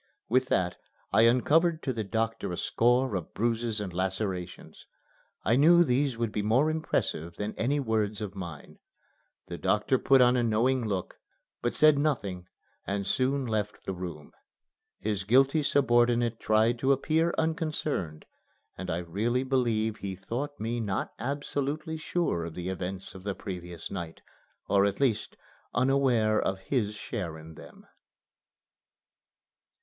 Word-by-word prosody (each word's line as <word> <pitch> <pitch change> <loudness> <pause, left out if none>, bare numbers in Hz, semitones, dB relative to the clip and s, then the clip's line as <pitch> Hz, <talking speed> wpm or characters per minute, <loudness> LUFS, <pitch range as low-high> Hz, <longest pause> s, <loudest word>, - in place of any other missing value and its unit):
With 130 +2 +3
that 90 -5 0 0.4
I 115 +1 +6
uncovered 160 +7 +3
to 130 - -1
the 110 -2 -2
doctor 115 0 -2
a 90 - -4
score 125 +1 +2
of 90 -4 -4
bruises 115 0 0
and 95 -4 -5
lacerations. 95 -1 -4 0.6
I 115 - +4
knew 170 +6 +6
these 130 -3 +1
would 115 -2 -1
be 105 - -1
more 125 +9 +3
impressive 85 - -2
than 105 +3 -4
any 140 +6 0
words 110 -5 0
of 105 -3 -5
mine. 85 -6 -8 0.7
The 85 - -7
doctor 105 +7 +2
put 135 -1 +5
on 125 0 +5
a 125 - +2
knowing 120 +2 +1
look, 95 -3 -3 0.4
but 120 - -1
said 155 -1 +5
nothing 100 -12 -1 0.4
and 100 0 -2
soon 135 +4 +1
left 105 -3 -3
the 95 - -2
room. 85 -5 -7 0.7
His 105 -2 -2
guilty 135 +8 +4
subordinate 120 -4 +2
tried 110 +2 +2
to 135 +2 +2
appear 160 +5 +2
unconcerned, 155 - -2 0.5
and 95 0 -6
I 85 - 0
really 105 +9 -1
believe 115 -5 0
he 95 -2 -5
thought 125 +10 -5
me 115 +2 -2
not 100 -4 -2
absolutely 145 +3 -3
sure 155 - -1
of 85 - -7
the 90 +1 -4
events 95 0 -5
of 95 - -10
the 100 -1 -3
previous 90 -3 -7
night, 85 -4 -6 0.5
or 100 -1 +4
at 100 - -3
least 130 -6 0 0.4
unaware 125 -4 +3
of 95 - -1
his 105 +1 -1
share 85 -6 -5
in 80 +1 -11
them. - - -14
115 Hz, 145 wpm, -28 LUFS, 95-130 Hz, 0.7 s, I